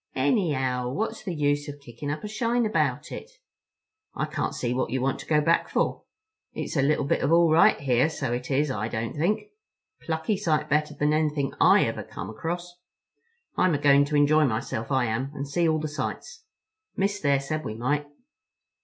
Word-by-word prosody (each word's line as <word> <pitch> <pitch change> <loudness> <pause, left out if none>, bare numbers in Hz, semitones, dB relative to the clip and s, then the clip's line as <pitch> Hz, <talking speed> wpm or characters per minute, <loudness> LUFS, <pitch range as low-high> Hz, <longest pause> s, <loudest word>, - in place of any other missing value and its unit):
"Anyhow, 130 -4 +1
what's 220 - -3
the 180 -4 -4
use 145 0 0
of 145 0 -7
kicking 140 +1 -8
up 150 +1 -4
a - - -3
shine 230 +2 0
about 215 - 0
it? 460 - -7 0.9
I - - -1
can't - - -3
see 120 -1 -1
what 130 - -1
you 130 - -1
want 130 +1 -1
to - - -10
go 150 -1 +3
back 165 +3 +2
for. - - -1 0.5
It's - - -5
a 140 - +3
little 145 +1 +2
bit - - 0
of 140 - +1
all 170 -1 +5
right 160 - +5
here, 130 +1 +2
so 135 -6 -3
it 125 +1 -4
is—I 130 -6 0
don't 115 +2 -4
think. 205 - -1 0.5
Plucky 160 +5 -1
sight 155 -6 0
better 150 +1 0
than 150 +1 +1
anything 150 -3 0
I - - +6
ever - - -3
come 95 +5 -7
across. 175 +8 -5 0.8
I'm 180 -4 +3
a - - +1
goin' 140 0 +5
to 150 +1 -3
enjoy 150 +1 +4
myself 110 0 -3
I 130 -2 +2
am, 120 +4 -2
and 140 +1 -4
see 165 +4 +1
all 155 0 +1
the 155 - -3
sights. 155 - -6 0.5
Miss, 200 +1 0
there, 140 -2 +2
said 155 +3 -3
we 110 - -5
might." 145 +5 -1
145 Hz, 195 wpm, -26 LUFS, 130-160 Hz, 0.9 s, I